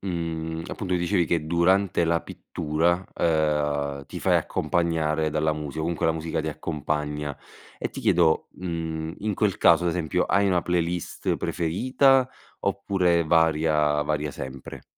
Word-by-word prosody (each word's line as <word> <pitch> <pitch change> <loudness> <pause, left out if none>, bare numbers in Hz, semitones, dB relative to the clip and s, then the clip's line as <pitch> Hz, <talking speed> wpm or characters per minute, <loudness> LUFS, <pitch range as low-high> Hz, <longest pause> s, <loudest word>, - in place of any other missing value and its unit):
mhmm, 80 -3 -3
appunto, 95 -3 -3
dicevi 90 0 +1
che 80 -2 0
durante 85 +2 +2
la 85 0 +1
pittura, 85 +4 -1
ehm, 75 -3 0
ti - - -7
fai - - +3
accompagnare 80 -2 0
dalla 80 +1 +1
musica 75 0 -5
o - - -2
comunque 80 0 -1
la 80 - +3
musica 80 0 -3
ti 80 - -3
accompagna. 75 -1 -3 0.4
Ehm, - - -3
ti - - -7
chiedo: 85 -2 +3
mhmm, 80 -2 -4
in 105 0 -2
quel 100 -1 +1
caso, 85 +1 +5
ad 85 - +2
esempio, 80 -3 0
hai 100 +1 +2
una 90 -3 +2
playlist 85 0 -1
preferita 130 - +2 0.3
oppure 95 -4 +1
varia 75 -2 +2
varia 75 0 -1
sempre? 65 0 -8
80 Hz, 145 wpm, -25 LUFS, 75-90 Hz, 0.4 s, caso